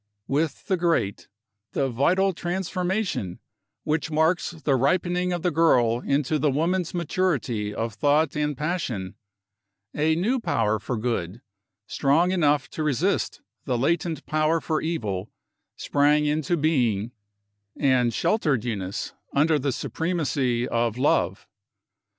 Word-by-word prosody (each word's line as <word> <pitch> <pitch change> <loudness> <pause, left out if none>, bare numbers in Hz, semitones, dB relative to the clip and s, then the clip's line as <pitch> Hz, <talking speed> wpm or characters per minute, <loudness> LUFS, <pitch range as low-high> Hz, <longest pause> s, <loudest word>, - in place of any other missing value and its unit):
With 145 +1 -1
the 190 -3 +1
great, 165 - 0 0.5
the 135 - +1
vital 180 +10 +2
transformation, 180 - -2 0.5
which 155 +1 -1
marks 160 +3 +2
the 155 -4 -1
ripening 180 +6 +1
of 175 -2 -2
the 180 - +2
girl 125 -8 +3
into 140 +3 0
the 150 +1 +2
woman's 170 +5 0
maturity 145 - -1
of 115 +1 -3
thought 145 +4 +2
and 150 -2 -1
passion, 135 - -3 0.8
a 155 +1 +2
new 225 +10 +1
power 110 - 0
for 120 +3 -3
Good, 110 -3 -2 0.4
strong 155 - +2
enough 150 -6 +2
to - - -5
resist 155 +6 0 0.2
the 125 -3 0
latent 160 +3 0
power 155 +1 +1
for 155 -1 -1
Evil, 110 - -3 0.5
sprang 150 +1 +2
into 155 +2 0
being, 120 -9 +1 0.7
and 130 -4 +3
sheltered 135 - +1
Eunice 100 -5 -3 0.2
under 150 +2 +3
the 140 0 0
supremacy 135 -6 -1
of 115 -2 0
Love. 95 -8 +1
150 Hz, 125 wpm, -25 LUFS, 125-170 Hz, 0.8 s, girl